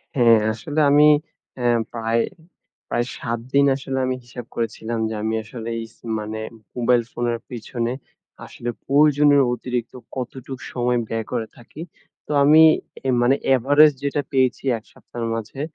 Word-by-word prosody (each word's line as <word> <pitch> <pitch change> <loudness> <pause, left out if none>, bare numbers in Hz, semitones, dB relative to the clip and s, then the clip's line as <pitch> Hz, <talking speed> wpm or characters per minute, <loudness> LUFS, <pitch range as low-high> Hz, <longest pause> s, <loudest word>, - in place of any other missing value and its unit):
হ্যাঁ, 120 -3 +6 0.2
আসলে 150 +6 -4
আমি 150 +1 +7 0.5
আ - - -3 0.3
প্রায়, 115 0 0 0.7
প্রায় 120 - 0
৭ 120 -3 -3
দিন 140 0 +5
আসলে 135 0 -4
আমি 130 0 -1
হিসাব 120 0 -9
করেছিলাম 115 0 -3
যে, - - -4
আমি 110 0 -1
আসলে 115 +1 -7
এই 115 - -5
স - - -30 0.2
মানে 110 +1 -5 0.3
মোবাইল 120 0 +3
ফোনের 120 -1 -2
পেছনে 120 0 -4 0.5
আসলে 120 - -6 0.2
প্রয়োজনের 145 0 +5
অতিরিক্ত 125 -1 -4 0.2
কতটুকু 130 +1 -6
সময় 125 -1 +1
ব্যয় 115 0 -3
করে 115 -3 -2
থাকি। 125 +5 -12 0.4
তো - - -7
আমি 155 +3 +7 0.5
এ - - +2
মানে 125 +3 +4 0.2
এভারেজ 145 +5 +5
যেটা 145 +1 0
পেয়েছি 130 -2 +1
১ 110 - -13
সপ্তাহের 115 -1 -7
মাঝে 115 +5 -6
120 Hz, 150 wpm, -22 LUFS, 115-135 Hz, 0.7 s, আমি